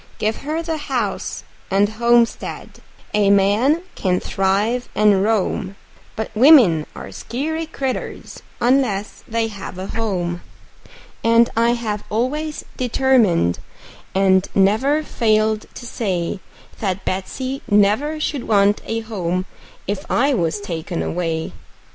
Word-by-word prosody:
Give 215 +1 -1
her 310 +3 -3
the 325 -1 -2
house 245 -9 -3 0.3
and 200 +1 +3
homestead 235 +2 0 0.3
a 205 -1 +3
man 210 - +3
can 180 -2 0
thrive 205 +6 0
and 205 -2 +4
roam; 200 -2 0 0.4
But 220 0 -4
women 220 - +6
are 95 - -8
skeery 315 - -4
critters, 270 -4 -5 0.2
unless 235 -5 +1
they 230 0 0
have 195 -3 -8
a 185 - -5
home; 185 -6 -2 0.8
And 230 +1 +4
I 230 +1 +3
have 215 -3 -3
always 295 +8 -2
determined, 235 - +2 0.6
and 190 -1 +3
never 240 +11 +3
failed 215 -4 +1
to 240 - -8
say, 190 -6 -2 0.4
That 190 -2 -2
Betsey 255 +8 -3
never 210 +10 +2
should 290 -4 -3
want 205 -1 +3
a 225 0 -2
home 185 -5 -2 0.4
if 200 0 -4
I 275 +3 +2
was 175 -3 0
taken 170 -3 -4
away. 165 -2 -2
215 Hz, 120 wpm, -20 LUFS, 195-250 Hz, 0.8 s, women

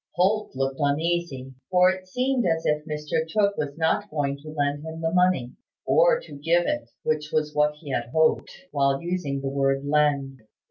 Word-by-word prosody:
Holt 205 0 +1
looked 135 +1 -2
uneasy; 145 -2 -1 0.2
for 180 0 +5
it 185 0 -7
seemed 255 +5 0
as 165 -3 0
if 150 0 +1
Mr 150 0 -2
Tooke 200 +1 +2
was 145 0 -4
not 165 +6 +1
going 140 -4 -1
to 150 +2 -11
lend 145 -1 -1
him 160 0 -7
the 165 0 -1
money, 180 -9 +2 0.3
or - - +4
to - - -12
give 170 +4 +2
it, 120 -1 -2
which 150 -1 -1
was 150 -1 0
what 150 0 +2
he 150 -2 -9
had 120 -2 -1
hoped, 160 +1 +2 0.2
while 140 -1 +2
using 170 -6 -2
the 135 - -3
word 135 0 0
"lend." 140 -2 +1
150 Hz, 185 wpm, -25 LUFS, 140-175 Hz, 0.3 s, for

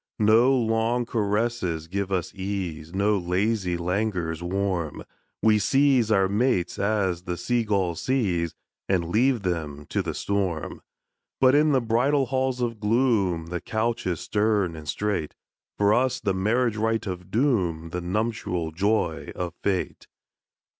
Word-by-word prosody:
No 110 +4 +5
long 115 -1 +1
caresses 105 -7 -1
give 100 +2 -3
us 90 -3 -1
ease, 95 -5 -4
No 100 +2 +1
lazy 90 +1 0
languors 90 -2 -1
warm, 90 -3 -2 0.4
We 110 -1 +5
seize 135 0 +3
our 95 -2 +4
mates 100 -3 0
as 95 -4 0
the 90 -2 -3
sea 120 +6 0
gulls 95 -5 0
seize, 95 -11 0 0.3
And 90 -3 +1
leave 120 +3 +2
them 75 -5 -3
to - - 0
the - - -4
storm. 95 -6 -2 0.6
But 130 0 +5
in 150 +1 +4
the 135 -2 +3
bridal 125 +5 +2
halls 130 -1 -1
of 115 -3 -2
gloom 105 -7 +1
The 90 - -2
couch 115 -1 -1
is 85 -4 -2
stern 105 -5 +1
and 80 -1 -10
strait; 105 -7 -2 0.4
For 100 0 +4
us 130 +2 +1
the 105 -6 0
marriage 110 +4 +1
rite 110 +1 0
of 90 -1 -6
Doom, 95 - 0
The 90 - -3
nuptial 90 -3 -2
joy 90 -1 0
of 90 -1 -4
Fate. 95 -3 -2
100 Hz, 145 wpm, -25 LUFS, 90-115 Hz, 0.6 s, No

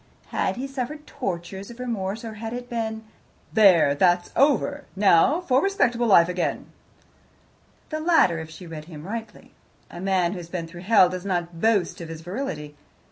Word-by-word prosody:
Had - - -1
he 255 +2 -4
suffered 275 +3 -5
tortures 190 -1 -5
of 235 +1 -12
remorse, 225 -3 -3
or 225 - -6
had 225 +2 -6
it 245 0 -6
been, 220 -1 -3 0.5
"There! 185 -9 +6
that's 175 +4 +2
over. 285 +1 +2
Now 200 - +4
for 265 -6 +2
respectable 245 -12 +1
life 170 -5 +6
again"? 180 -1 -3 1.2
The 310 - -3
latter, 310 - +3
if 160 0 -7
she 160 +3 -11
read 160 -2 -8
him 155 -2 -10
rightly. 220 +1 -7 0.4
A 175 - -8
man 185 -3 +1
who 195 - -5
has 170 -1 -10
been 170 -2 -4
through 175 +1 -11
hell 195 -1 +5
does 180 0 -5
not 175 -3 -3
boast 205 -7 +1
of 165 - -7
his 165 -1 -7
virility. 165 - -5
195 Hz, 175 wpm, -24 LUFS, 175-240 Hz, 1.2 s, There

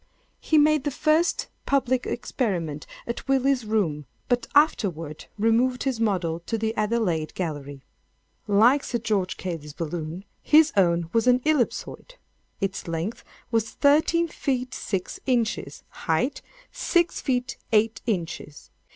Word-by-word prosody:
He 315 - +2
made 305 -1 +4
the 290 - 0
first 310 +4 +1 0.2
public 260 -2 +1
experiment 175 - -2 0.2
at 235 - -5
Willis's 270 -3 +2
Rooms, 170 -9 0 0.2
but 245 -1 +1
afterward 170 - +1
removed 235 +4 +2
his 265 -4 -1
model 180 -7 0
to 225 - -1
the 220 0 -2
Adelaide 210 -8 0
Gallery. 145 -6 -5 0.6
"Like 230 +7 +5
Sir 240 - -2
George 210 -5 -1
Cayley's 160 -5 -5
balloon, 165 +3 -5 0.2
his 315 +1 +5
own 170 -3 +2
was 230 +2 +2
an 250 0 +5
ellipsoid. 310 - -1 0.4
Its 195 -2 -3
length 165 +7 -3 0.3
was 225 -1 +1
thirteen 315 +4 +3
feet 255 -5 -2
six 190 -4 -3
inches—height, 220 - -1 0.3
six 345 -1 +1
feet 250 -2 -1
eight 225 +1 +2
inches. 165 -7 -4
225 Hz, 125 wpm, -25 LUFS, 170-260 Hz, 0.6 s, Like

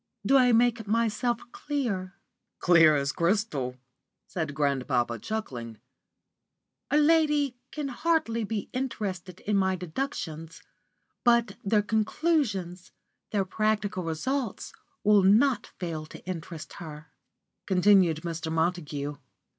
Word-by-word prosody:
Do 275 - +4
I 250 -2 +6
make 230 -1 +3
myself 230 +2 +1
clear?" 205 -11 -3 0.4
"Clear 165 -4 +6
as 140 0 0
crystal," 170 - 0 0.5
said 155 -5 -4
grandpapa, 130 -5 0
chuckling. 120 - -5 1.1
"A 295 - +3
lady 300 -3 +3 0.2
can 295 -2 -4
hardly 260 -5 0
be 210 -1 -3
interested 195 -8 -4
in 210 -1 0
my 190 -1 +2
deductions, 165 - -5 0.6
but 235 -4 +3
their 205 +1 +2
conclusions, 215 - 0 0.4
their 200 -2 0
practical 210 -1 0
results, 230 - -3 0.3
will 210 -1 +6
not 215 +5 +4
fail 160 -3 -4
to - - -12
interest 165 -3 -6
her," 150 -3 -9 0.6
continued 185 -4 +4
Mr. 165 -1 -4
Montague. 155 -4 -1
195 Hz, 105 wpm, -28 LUFS, 160-235 Hz, 1.1 s, I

